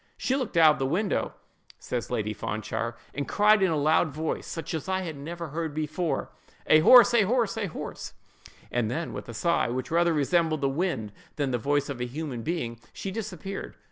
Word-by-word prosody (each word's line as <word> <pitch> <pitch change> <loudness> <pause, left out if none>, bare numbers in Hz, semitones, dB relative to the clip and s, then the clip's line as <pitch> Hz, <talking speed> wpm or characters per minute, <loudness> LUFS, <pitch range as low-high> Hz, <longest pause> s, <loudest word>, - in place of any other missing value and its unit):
"She 260 - 0
looked 255 -10 -2
out 160 -2 +8
of - - -8
the 135 - 0
window," 190 +8 -1 0.4
says 120 -2 -4
Lady 110 -3 -1
Fanshawe, 110 +3 -3 0.2
"and 145 - -3
cried 210 0 +4
in 190 - +4
a 160 - +1
loud 155 +3 +3
voice, 155 +2 -3
such 165 0 -5
as 160 +3 -4
I 185 -3 -1
never 165 +4 -6 0.2
before 155 +3 -1
heard, - - -6 0.4
'A 155 - +6
horse!—a 235 +5 +8
horse!—a 225 -2 0
horse!' 160 - -7 0.6
and 120 -3 0
then 160 +7 -3
with - - -7
a 115 - -7
sigh, 170 +8 +1
which 125 +3 -3
rather 170 +1 +3
resembled 155 +1 +1
the 135 - +2
wind 135 - -2 0.2
than 140 -3 -1
the 120 - 0
voice 145 +3 +1
of 135 -4 -5
a 125 - -1
human 135 -2 -5
being, 120 -6 -3
she 195 - -5
disappeared. 195 -2 -6
155 Hz, 190 wpm, -27 LUFS, 135-180 Hz, 0.6 s, out